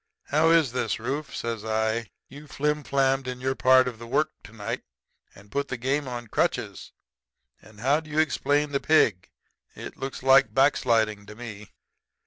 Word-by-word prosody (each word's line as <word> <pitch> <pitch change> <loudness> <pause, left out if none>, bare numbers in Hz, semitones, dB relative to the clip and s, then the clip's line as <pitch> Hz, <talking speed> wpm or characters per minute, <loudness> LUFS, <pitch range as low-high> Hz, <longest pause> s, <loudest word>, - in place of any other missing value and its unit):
"'How 155 +3 +3
is 165 -6 +4
this, 115 -4 -2
Rufe?' 135 +6 -4
says 115 -2 -4
I. 110 +1 -1 0.2
'You 145 +2 -12
flimflammed 140 -2 0
in 125 0 -5
your 130 +1 -1
part 130 0 +5
of 120 -3 -6
the 115 - -9
work 145 +5 +1
to - - -13
night 115 +2 -5 0.5
and 100 +1 -17
put 140 0 -1
the 130 - -4
game 135 +4 -1
on 120 -1 -5
crutches. 110 - -2 0.7
And 105 -1 -16
how 140 +5 +3
do 160 -1 -13
you 150 - -5
explain 150 -2 +1
the 140 - 0
pig? 115 - +2 0.5
It - - -9
looks 135 -1 -6
like 135 0 +5
back 135 +2 +5
sliding 110 -3 0
to 105 - -10
me.' 105 -3 -9
130 Hz, 175 wpm, -26 LUFS, 115-140 Hz, 0.7 s, part